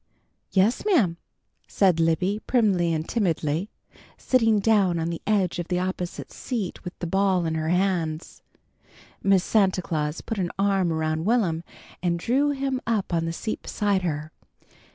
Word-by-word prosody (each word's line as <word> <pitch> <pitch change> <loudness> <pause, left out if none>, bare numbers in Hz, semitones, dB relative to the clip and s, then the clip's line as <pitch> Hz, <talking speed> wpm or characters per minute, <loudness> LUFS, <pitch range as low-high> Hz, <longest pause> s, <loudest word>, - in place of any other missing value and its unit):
"Yes, 205 +5 +2
ma'am," 235 - +2 0.5
said 185 -5 +2
Libby, 180 +6 +1
primly 195 -9 +2
and 160 0 -2
timidly, 170 -4 0 0.5
sitting 225 -4 +3
down 200 -5 +3
on 165 0 -1
the 170 - -5
edge 195 -5 +1
of 175 - -3
the 180 - 0
opposite 180 -1 -4
seat 225 -8 -4
with 180 -1 -8
the - - -4
ball 190 0 +1
in 160 - -1
her 160 0 -1
hands. 175 -3 -1 0.8
Miss 195 -2 +3
Santa 190 -4 +2
Claus 150 -2 -2
put 225 - -4
an 180 -2 0
arm 195 -3 +2
around 160 0 -1
Will'm 195 -8 +1 0.4
and 170 -1 0
drew 265 +11 +1
him 270 -2 -1
up 215 -6 0
on 165 -1 +1
the 165 - -2
seat 215 +6 -4
beside 205 -3 0
her. 155 -3 -3
185 Hz, 155 wpm, -25 LUFS, 165-210 Hz, 0.8 s, sitting